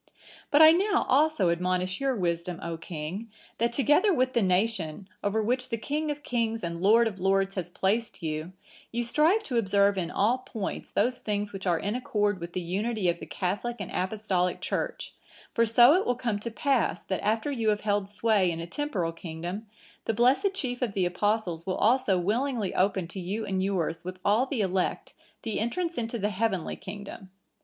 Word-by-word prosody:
"But 295 +2 +7
I 315 - +10
now 395 +4 +2
also 285 - +3
admonish 185 +3 -1
your 270 -1 +1
wisdom, 175 -2 -2
O 170 0 -3
king, 165 +7 -6 0.3
that 235 +1 +2
together 295 - +3
with 255 -5 +1
the 235 - +2
nation, 190 -2 0 0.2
over 215 +2 +1
which 250 +3 0
the 230 - -1
King 300 +7 -2
of 295 0 -4
kings, 230 -3 -1
and 170 0 -4
Lord 225 +5 +5
of 195 -4 -5
lords, 195 +1 +2
has 180 -3 -4
placed 195 +2 -1
you, 155 +2 -3 0.4
you 240 +1 -1
strive 315 - +3
to 250 - -2
observe 200 -2 +3
in 170 -2 -2
all 235 +6 +2
points 225 -6 -5
those 250 0 +1
things 205 -1 -2
which 195 -1 -5
are 175 -2 +3
in 205 +5 -2
accord 210 -5 0
with 170 0 -7
the 185 - -2
unity 195 +3 -1
of 170 0 -1
the - - -8
Catholic 205 +6 -2
and 200 - -5
Apostolic 185 -2 0
Church; - - -3 0.4
for 230 0 +3
so 240 +5 +7
it 370 +3 +3
will 245 - +2
come 235 -4 -2
to 235 - -4
pass, 270 +2 0
that 190 - -3
after 220 +7 0
you 230 -5 0
have 210 -1 +1
held 205 -2 0
sway 205 -3 +2
in 165 -1 -3
a 165 - -4
temporal 185 - -2
kingdom, 175 +5 -6 0.4
the 225 - 0
blessed 270 - +3
chief 250 -8 -3
of 235 -5 -1
the 190 -2 +1
Apostles 180 -2 -1
will 185 - -1
also 230 -4 +3
willingly 220 +3 0
open 190 -2 +1
to 190 - -7
you 200 +5 -3
and 190 -1 -1
yours 175 -4 -1
with 185 +1 -6
all 215 +6 +3
the 260 -5 -1
elect 190 -1 -1 0.3
the 220 -2 -2
entrance 330 - -1
into 235 -2 -2
the 205 -1 0
heavenly 195 -3 -1
kingdom. 195 -1 -9
205 Hz, 195 wpm, -28 LUFS, 185-240 Hz, 0.4 s, I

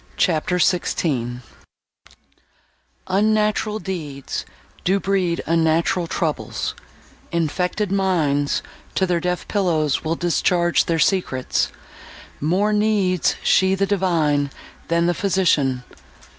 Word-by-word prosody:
CHAPTER 175 +1 +1
XVI 135 -9 0 1.6
Unnatural 215 +2 +1
deeds 155 -10 -5 0.4
Do 195 +2 +2
breed 190 -4 0
unnatural 165 +1 +1
troubles: 165 -3 -2 0.6
infected 180 +5 -1
minds 160 -8 +1 0.3
To 190 - +2
their 175 -2 +1
deaf 180 +1 -2
pillows 160 -8 +1
will 160 +1 0
discharge 175 0 +2
their 165 - 0
secrets. 155 -6 +1 0.7
More 190 +8 +1
needs 210 -4 +2
she 190 0 +4
the 195 +1 +1
divine, 165 -8 +1 0.4
than 170 0 +2
the 175 - +2
physician. 155 -10 +1
175 Hz, 95 wpm, -21 LUFS, 155-190 Hz, 1.6 s, she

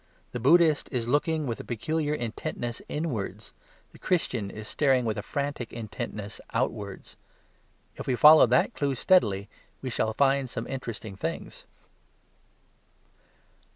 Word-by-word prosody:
The 125 - -4
Buddhist 155 +4 +4
is 120 -4 -1
looking 150 +4 +1
with 115 -4 -3
a - - -6
peculiar 150 +6 -1
intentness 120 -1 -4
inwards. 110 - -4 0.4
The - - -16
Christian 125 - 0
is 105 +1 -8
staring 135 -4 +2
with 110 -2 0
a 105 - -3
frantic 140 0 -3
intentness 110 -2 -6
outwards. 105 -5 -3 0.8
If - - -7
we 130 - +2
follow 150 +2 +8
that 125 +2 +3
clue 140 -2 -1
steadily 105 - +3 0.3
we 130 - -5
shall 110 -1 0
find 135 -1 +2
some 115 -1 -4
interesting 115 -6 -6
things. - - -5
125 Hz, 130 wpm, -27 LUFS, 110-145 Hz, 0.8 s, follow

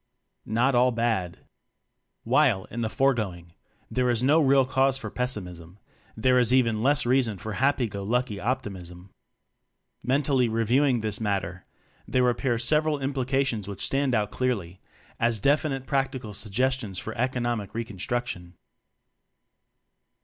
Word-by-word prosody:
Not 120 +5 +2
All 125 +1 +4
Bad. 115 -7 -1 0.9
While, 120 -5 +3
in 120 - -4
the 110 - -1
foregoing, 105 -11 -1 0.4
there 125 -1 +1
is 120 0 +1
no 150 +5 +4
real 135 -2 +4
cause 135 +1 +2
for - - -7
pessimism, 90 -8 -4 0.4
there 125 +3 +3
is 120 -1 +2
even 115 -4 +3
less 145 +3 +2
reason 120 -4 +2
for 110 +4 -6
happy 135 +1 +1
go 100 -2 -6
lucky 115 +1 -1
optim 105 -4 -3
ism. 90 +2 -13 0.9
Mentally 130 -1 +2
reviewing 120 +3 +2
this 105 0 -3
matter, 95 -4 -2 0.4
there 125 -1 +2
appear 120 0 -1
several 150 +5 +1
implications 135 -5 -1
which 100 -2 -4
stand 135 -2 0
out 105 -2 0
clearly 100 -9 -2 0.4
as 115 -1 +2
definite 140 +2 +1
practical 135 -5 -2
suggestions 110 0 -1
for 110 +3 -6
economic 120 -4 -2
re 115 - -1
construction. 95 -4 -4
120 Hz, 135 wpm, -26 LUFS, 105-130 Hz, 0.9 s, All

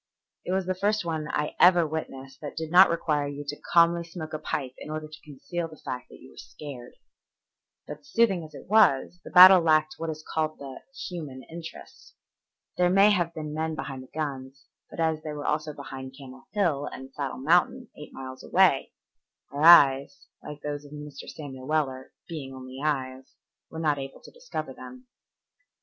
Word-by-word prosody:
It - - -4
was 190 0 0
the 185 - 0
first 205 +1 0
one 160 -2 -3
I 150 - -2
ever 175 -2 +6
witnessed 135 -4 -6
that 150 -1 -7
did 160 -1 -4
not 185 +2 +8
require 150 -3 0
you 145 0 -6
to 145 - -6
calmly 170 0 +5
smoke 165 -2 -8
a 155 - -3
pipe 130 -4 -3
in - - -9
order 155 0 -5
to 155 0 -13
conceal 155 +4 -5
the 155 -1 -14
fact 125 -2 -7
that - - -14
you - - -15
were - - -21
scared. 135 -5 -10 0.9
But 150 0 -9
soothing 195 -5 +2
as 155 - -12
it - - -11
was, 180 -6 +3
the - - -9
battle 185 0 +10
lacked 155 -1 +3
what 165 0 -3
is 155 0 -7
called 155 -1 -2
the 135 -2 -9 0.3
human 150 -7 -7
interest. 165 0 -11 0.6
There 180 0 +3
may 195 +3 +6
have 175 -4 +1
been 155 -1 -5
men 160 +1 -2
behind 135 -4 -6
the 130 - -13
guns, 135 -3 -5 0.2
but - - -11
as 160 -1 +1
they 155 -1 -6
were 145 -1 -6
also 150 0 -1
behind 135 -2 -9
Camel 130 -2 -13
Hill 165 -9 0
and 130 0 -9
Saddle 140 -3 -4
Mountain, 175 - +2
eight 150 - -11
miles 130 -1 -9
away, 185 -7 +3 0.6
our 145 - -4
eyes, 140 -4 +6 0.2
like 150 0 -10
those 145 0 -4
of 145 0 -13
Mr. 150 -1 -9
Samuel 135 -4 -9
Weller, 135 -4 -1 0.2
"being 140 -5 -7
only 130 0 -9
eyes," 130 -3 -3 0.3
were 160 - -9
not 150 -3 0
able 135 0 -8
to - - -14
discover - - -6
them. 255 0 -12
155 Hz, 190 wpm, -27 LUFS, 140-170 Hz, 0.9 s, battle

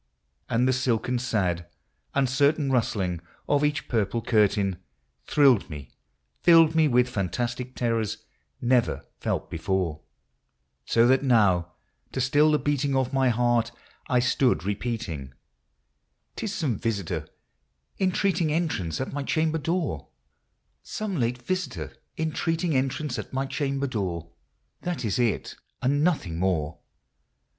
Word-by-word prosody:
And 120 +2 +2
the 130 - +3
silken, 125 -1 0
sad, 90 -8 -1 0.5
uncertain 140 +2 +2
rustling 95 -8 0 0.3
of 145 0 +2
each 150 0 0
pur 115 -4 +2
ple 115 +4 -3
curtain 100 -4 +2 0.5
Thrilled 135 -10 +4
me, 75 -4 -8 0.2
— - - -47
filled 165 -2 +6
me 160 -1 +4
with 125 -2 +3
fantastic 120 +3 -3
terrors 115 -3 -1 0.3
never 125 -1 +1
felt - - -2
before; 85 -2 -1 0.9
So 115 0 +4
that 130 +2 +4
now, 100 -10 +3 0.4
to - - -2
still 145 +4 +4
the 150 - +4
beating 145 -2 0
of 130 0 0
my 135 -1 +3
heart, 120 0 +2 0.4
I 125 - +3
stood 125 - +2
repeating, 100 - -4 0.5
" - - -50
'T - - -4
is 205 - -3
some 130 - -1
visitor 100 -7 -2 0.7
entreating 185 -3 +1
entrance 150 - -1
at 130 - -3
my 145 - -2
cham 155 +3 +1
ber 160 - -1
door, 160 - -2 0.4
— - - -47
Some 210 -4 -4
late 125 +1 -1
visitor 185 -1 -3 0.2
entreating 160 +1 -1
entrance 135 +1 -1
at - - -8
my 135 +1 0
cham 140 0 -2
ber 140 - 0
door; 90 - -3 0.5
That 175 -9 -3
it 110 +3 0
is, 120 -3 0 0.2
and 145 +3 +1
nothing 110 - 0
more." 85 -4 0
125 Hz, 140 wpm, -26 LUFS, 105-145 Hz, 0.9 s, filled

